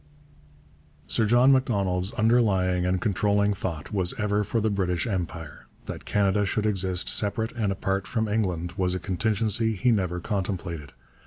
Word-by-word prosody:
Sir 110 - +1
John 120 +4 +5
Macdonald's 100 -8 +1
underlying 95 -6 +2
and 90 0 +1
controlling 100 +1 +1
thought 85 -2 -5
was 95 -3 +1
ever 105 -1 0
for 110 +3 -1
the 110 0 0
British 90 -3 -1
Empire. 85 -6 -5 0.2
That - - -7
Canada 100 0 +1
should 105 +2 -1
exist 95 -3 0
separate 110 +2 0
and 110 -4 -1
apart 95 0 -2
from 110 -3 -1
England 90 -5 -1
was 90 -1 +1
a - - -2
contingency 110 +2 +1
he 120 +6 +2
never 90 -5 0
contemplated. 90 -6 -4
100 Hz, 150 wpm, -26 LUFS, 90-110 Hz, 0.2 s, John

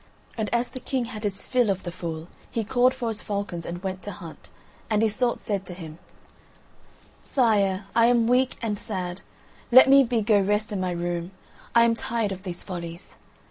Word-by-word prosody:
And 220 -2 -2
as 240 +1 +1
the 255 - -8
King 255 -1 -2
had 225 -3 -7
his 200 -2 -2
fill 250 -4 +2
of 190 -1 -1
the 175 - -4
fool 165 -1 -6 0.2
he 230 - -2
called 250 +4 +3
for 245 -3 -2
his 220 -2 -2
falcons 200 -5 -4
and 175 +2 -6
went 190 -1 -3
to 205 - -6
hunt; 170 -4 -11 0.4
and 215 0 +2
Iseult 235 +3 +1
said 200 -4 -2
to 180 - -6
him: 165 -2 -9 1.2
"Sire, 205 -6 +2
I 230 0 +6
am 240 -1 +4
weak 255 +1 +2
and 210 -3 -1
sad; 185 -4 -4 0.5
let 260 +2 +9
me 275 0 +7
be 235 -3 0
go 210 -1 +4
rest 210 +2 +1
in 200 -2 -2
my 185 - 0
room; 175 0 -2 0.5
I 235 - +7
am 235 0 +4
tired 230 -2 -1
of 190 -1 -5
these 180 -2 -5
follies." 170 -1 -8
205 Hz, 195 wpm, -25 LUFS, 180-235 Hz, 1.2 s, let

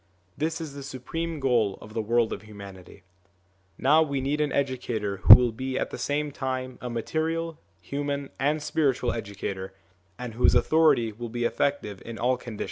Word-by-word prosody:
This 160 +2 -2
is 160 -4 -6
the 140 - -8
supreme 155 +5 -5
goal 120 -7 +1
of 110 - -12
the 115 - -1
world 115 +1 +1
of - - -6
humanity. 100 -4 -12 0.7
Now 150 +4 +4
we 140 -3 0
need 140 +3 -1
an 150 -2 0
educator 120 -7 -2
who 100 +2 +11
will 125 -1 +2
be 130 +3 -4
at - - -2
the - - -5
same 145 +4 -1
time 130 -2 -4
a 125 - -4
material, 160 +7 -2 0.2
human, 140 0 -4
and 150 +2 +1
spiritual 140 -5 +1
educator, 95 -3 -5 0.4
and 125 -2 -6
whose 120 - +4
authority 155 -8 +4
will 115 +2 -7
be 120 +1 -3
effective 120 -7 -1
in 115 -1 -7
all 125 +2 +2
conditions. 120 -3 -9
130 Hz, 175 wpm, -26 LUFS, 115-145 Hz, 0.7 s, who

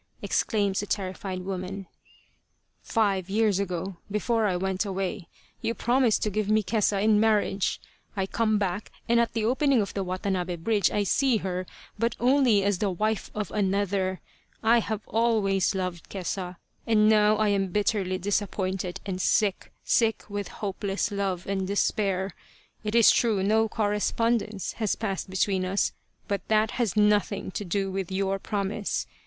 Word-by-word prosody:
exclaims 200 -3 +1
the 205 - -3
terrified 190 -1 -3
woman. 190 +1 -5 0.5
" - - -46 0.2
Five 195 -5 0
years 210 -1 +2
ago, 185 -1 -3
before 215 +1 +1
I 185 -3 0
went 190 +1 -1
away, 195 -2 -3 0.3
you 230 - -1
promised 240 0 +2
to 210 - 0
give 210 0 -1
me 215 0 +3
Kesa 205 0 +1
in 215 -1 +4
marriage. 210 -3 +1 0.4
I 190 - +1
come 215 +2 +1
back, 200 0 -2 0.2
and 235 0 +4
at 235 - +1
the 220 -1 0
opening 265 +2 +3
of 200 -3 -1
the 195 - -2
Watanabe 185 -1 -2
bridge 200 +2 +1
I 205 - 0
see 255 +5 +2
her, 185 -1 -3 0.3
but 230 0 +1
only 245 -5 +4
as 200 -2 +1
the 205 - +1
wife 215 +4 -1
of 210 -1 -3
another. 195 -2 0 0.4
I 230 +2 +5
have 220 -1 -4
always 210 -4 +2
loved 180 -3 -4
Kesa, 185 -1 -4 0.3
and 215 -2 +4
now 215 0 +5
I 215 0 +2
am 195 -1 +1
bitterly 195 -1 0
disappointed 190 -1 -2
and 190 -2 -3
sick 200 0 +1
sick 225 -2 +2
with 205 -2 -4
hopeless 200 0 -3
love 195 -3 -2
and 190 -1 -2
despair. 195 -1 0 0.5
It 210 +1 -2
is 230 -2 +7
true 215 -5 +2
no 220 +2 +3
correspondence 215 0 0
has 215 - +1
passed 195 -4 -3
between 190 0 +1
us, 190 +2 0 0.3
but 200 -1 -1
that 220 0 +2
has 215 -3 0
nothing 210 -2 +2
to 205 - -4
do 195 +1 -1
with 190 -1 -3
your 195 0 0
promise. 205 +1 -2
200 Hz, 160 wpm, -27 LUFS, 190-215 Hz, 0.5 s, is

